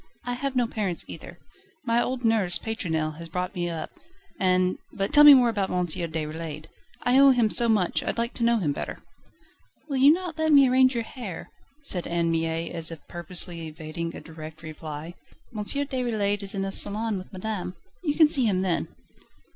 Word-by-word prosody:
"I 245 Hz, -, -2 dB
have 270 Hz, +2 st, -3 dB
no 245 Hz, -1 st, +3 dB
parents 205 Hz, -6 st, -2 dB
either. -, -, -10 dB, 0.5 s
My 235 Hz, 0 st, +2 dB
old 250 Hz, -1 st, -3 dB
nurse, 205 Hz, -6 st, +5 dB
Pétronelle, 160 Hz, -9 st, -3 dB
has 165 Hz, 0 st, -8 dB
brought 180 Hz, +3 st, -3 dB
me 175 Hz, -2 st, -2 dB
up, 165 Hz, -2 st, -5 dB, 0.5 s
and 185 Hz, -1 st, +2 dB
But 195 Hz, 0 st, -3 dB
tell 295 Hz, -, +8 dB
me 295 Hz, -1 st, +11 dB
more 250 Hz, -2 st, +4 dB
about 205 Hz, -4 st, -1 dB
M. 180 Hz, 0 st, 0 dB
Déroulède 160 Hz, -2 st, -4 dB, 0.4 s
I 250 Hz, +2 st, +4 dB
owe 275 Hz, 0 st, +8 dB
him 240 Hz, -5 st, +3 dB
so 235 Hz, -1 st, +4 dB
much, 205 Hz, -6 st, +1 dB
I'd -, -, -3 dB
like 235 Hz, +1 st, -2 dB
to 235 Hz, -, -4 dB
know 235 Hz, 0 st, +3 dB
him 165 Hz, -9 st, 0 dB
better." -, -, -6 dB, 0.8 s
"Will 275 Hz, -3 st, -2 dB
you 275 Hz, +3 st, +7 dB
not 340 Hz, -1 st, -2 dB
let 315 Hz, 0 st, +2 dB
me 280 Hz, -2 st, +7 dB
arrange 255 Hz, 0 st, +4 dB
your 235 Hz, -, -1 dB
hair?" 225 Hz, -6 st, -8 dB, 0.3 s
said 180 Hz, -10 st, 0 dB
Anne 170 Hz, -1 st, 0 dB
Mie 165 Hz, 0 st, -2 dB
as 165 Hz, -1 st, -2 dB
if 165 Hz, -2 st, -11 dB
purposely 175 Hz, -1 st, -4 dB
evading 160 Hz, +1 st, -6 dB
a -, -, -8 dB
direct 155 Hz, 0 st, -11 dB
reply. 155 Hz, +1 st, -7 dB, 0.4 s
"M. 210 Hz, -, -3 dB
Déroulède 235 Hz, -6 st, -1 dB
is 200 Hz, 0 st, -1 dB
in 195 Hz, -, -1 dB
the 195 Hz, -, -3 dB
salon 210 Hz, +1 st, +1 dB
with 185 Hz, -, -12 dB
madame. 190 Hz, -2 st, -5 dB, 0.3 s
You 295 Hz, -4 st, 0 dB
can 315 Hz, -, +6 dB
see 275 Hz, -5 st, +3 dB
him 190 Hz, -4 st, +1 dB
then." 180 Hz, -3 st, -1 dB
195 Hz, 195 wpm, -25 LUFS, 170-245 Hz, 0.8 s, me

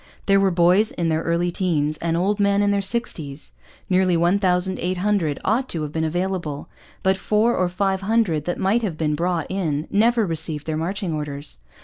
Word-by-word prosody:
There 195 Hz, 0 st, +4 dB
were 195 Hz, 0 st, +3 dB
boys 180 Hz, +4 st, +3 dB
in 170 Hz, -1 st, -1 dB
their 160 Hz, 0 st, +1 dB
early 170 Hz, +1 st, 0 dB
teens 155 Hz, -5 st, 0 dB
and 165 Hz, 0 st, -1 dB
old 200 Hz, +4 st, 0 dB
men 200 Hz, 0 st, +3 dB
in 205 Hz, -, +2 dB
their 200 Hz, 0 st, +1 dB
sixties. 165 Hz, -, -3 dB, 0.4 s
Nearly 185 Hz, -2 st, +2 dB
1,800 180 Hz, -1 st, +1 dB
ought 245 Hz, +6 st, +1 dB
to 160 Hz, -3 st, -2 dB
have 150 Hz, -, -4 dB
been 160 Hz, +1 st, -2 dB
available. 170 Hz, -3 st, -2 dB, 0.4 s
But 190 Hz, 0 st, +2 dB
four 215 Hz, +4 st, +2 dB
or 185 Hz, -1 st, +1 dB
five 190 Hz, +1 st, -1 dB
hundred 195 Hz, -8 st, +1 dB
that 175 Hz, -, -2 dB
might 200 Hz, +5 st, +1 dB
have 190 Hz, -8 st, -3 dB
been 155 Hz, -1 st, 0 dB
brought 170 Hz, +1 st, -1 dB
in 160 Hz, -6 st, -2 dB
never 225 Hz, +2 st, +3 dB
received 160 Hz, -3 st, -2 dB
their 155 Hz, -, -2 dB
marching 180 Hz, +2 st, -2 dB
orders. 145 Hz, -, -5 dB
180 Hz, 185 wpm, -22 LUFS, 160-200 Hz, 0.4 s, There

